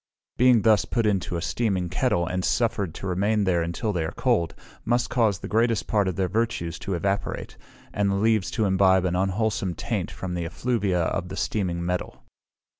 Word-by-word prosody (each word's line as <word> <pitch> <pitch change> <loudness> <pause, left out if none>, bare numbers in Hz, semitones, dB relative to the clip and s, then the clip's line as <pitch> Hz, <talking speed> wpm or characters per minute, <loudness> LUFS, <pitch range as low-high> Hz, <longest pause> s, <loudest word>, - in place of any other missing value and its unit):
Being 125 -3 +5
thus 110 -3 +5
put 115 -2 -1
into 95 -4 0
a 85 - -4
steaming 95 -6 0
kettle, 95 -1 +1
and 90 0 -2
suffered 100 -8 0
to - - -7
remain 100 +3 +1
there 90 -3 +2
until 85 +6 -2
they 85 -3 -1
are 80 - -3
cold, 105 - 0 0.3
must 120 +1 0
cause 110 -6 +2
the - - -7
greatest 115 +1 +1
part 105 -3 +1
of 95 - -1
their 95 0 0
Virtues 90 -5 -2
to 95 - -3
evaporate, 100 +3 -2 0.4
and 100 -1 +1
the 100 - +1
leaves 110 -2 +2
to 110 - +2
imbibe 95 -1 +4
an 90 -1 0
unwholesome 95 0 0
taint - - -3
from 95 -1 -6
the 85 -1 -2
effluvia 100 -1 0
of 90 +2 -2
the 95 - -6
steaming 85 -5 -1
metal. 90 0 -3
95 Hz, 190 wpm, -25 LUFS, 90-110 Hz, 0.4 s, Being